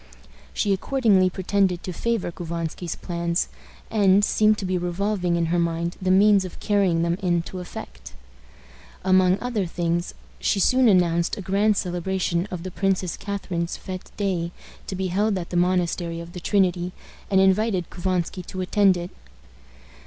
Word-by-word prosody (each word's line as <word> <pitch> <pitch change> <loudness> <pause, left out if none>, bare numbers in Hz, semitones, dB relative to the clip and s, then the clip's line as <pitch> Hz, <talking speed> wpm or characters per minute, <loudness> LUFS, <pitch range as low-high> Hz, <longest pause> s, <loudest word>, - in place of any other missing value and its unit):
She 200 - +1
accordingly 200 -3 +3
pretended 190 -1 0
to 185 - -5
favor 230 -1 -1
Couvansky's 170 0 -4
plans, 170 0 -2 0.4
and 205 -2 +4
seemed 215 0 +3
to 195 - -4
be 185 0 -1
revolving 180 0 -1
in 170 0 0
her 175 - +2
mind 170 0 -1
the 185 - 0
means 200 +1 +5
of 185 - -8
carrying 195 -5 +2
them 170 +2 0
into 175 0 -1
effect. 60 - -9 0.9
Among 185 0 +4
other 230 -7 -2
things, 170 +1 -2 0.2
she 200 - +1
soon 255 +6 +4
announced 170 -4 +3
a - - -5
grand 200 +3 +2
celebration 180 0 -1
of 175 -2 -6
the 185 - -5
Princess 190 -2 0
Catharine's 190 -4 -4
fête 185 -1 -7
day, 180 -4 -1 0.4
to 190 - -4
be 190 0 -2
held 200 +3 +1
at 175 -2 -6
the - - -3
Monastery 175 -1 0
of 170 +1 -9
the 180 - -6
Trinity, 180 -2 +1 0.4
and 190 - +4
invited 190 -1 +2
Couvansky 185 0 -2
to 185 - -5
attend 190 0 +3
it. 175 +2 -6
185 Hz, 155 wpm, -24 LUFS, 175-195 Hz, 0.9 s, means